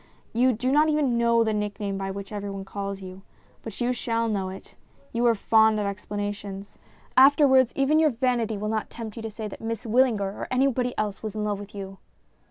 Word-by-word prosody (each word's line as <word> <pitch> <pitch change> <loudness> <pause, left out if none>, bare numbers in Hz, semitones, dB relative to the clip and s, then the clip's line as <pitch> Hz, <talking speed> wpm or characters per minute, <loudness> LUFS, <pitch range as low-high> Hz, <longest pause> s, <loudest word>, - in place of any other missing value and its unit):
You 250 +3 +4
do 250 +4 -1
not 300 +2 +4
even 295 -5 +1
know 235 0 +3
the 220 -1 0
nickname 205 -1 -2
by 195 0 -3
which 195 +1 -6
everybody 200 -2 -5
calls 200 0 -5
you. 185 +1 -9 0.4
But 220 -3 -8
you 245 0 +1
shall 230 -1 -1
know 195 -4 -1
it; 190 +1 -10 0.4
you 235 +1 0
are 230 - +4
fond 220 +1 +4
of 205 - -1
explanations. 205 0 -5 0.4
Afterwards, 265 -2 +6
even 280 +3 +3
your 315 -1 +5
vanity 235 -3 0
will 210 +1 -3
not 220 0 -2
tempt 225 -3 -7
you - - -5
to 225 - -4
say 215 0 -6
that 205 - -10
Miss 230 +1 -4
Wyllinger 235 -1 +3 0.2
or - - -4
anybody 255 -1 +1
else 210 -2 -2
was 215 -2 -5
in 215 - -2
love 205 -1 -1
with 205 +1 -10
you." 195 -1 -7
220 Hz, 205 wpm, -25 LUFS, 200-245 Hz, 0.4 s, Afterwards